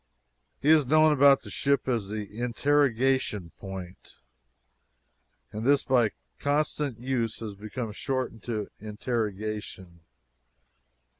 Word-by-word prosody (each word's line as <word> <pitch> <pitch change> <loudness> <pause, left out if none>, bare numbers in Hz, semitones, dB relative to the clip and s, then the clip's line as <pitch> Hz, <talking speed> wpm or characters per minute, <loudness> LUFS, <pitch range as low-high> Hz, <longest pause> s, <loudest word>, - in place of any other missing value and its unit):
He 145 - +1
is 155 -4 +5
known 155 +2 +5
about 140 -1 +6
the - - -9
ship 140 -1 +1
as 115 -6 0
the 105 0 -3 0.2
"Interrogation 125 - +1
Point," 95 -2 -9 1.4
and 110 +1 -5
this 140 +3 +4
by 125 -4 +3 0.3
constant 145 -3 0
use 120 -3 -1
has 110 -3 -6
become 110 +3 -5
shortened 130 -1 -3
to 110 -4 -3
"Interrogation." 105 -4 -4
120 Hz, 105 wpm, -27 LUFS, 105-140 Hz, 1.4 s, about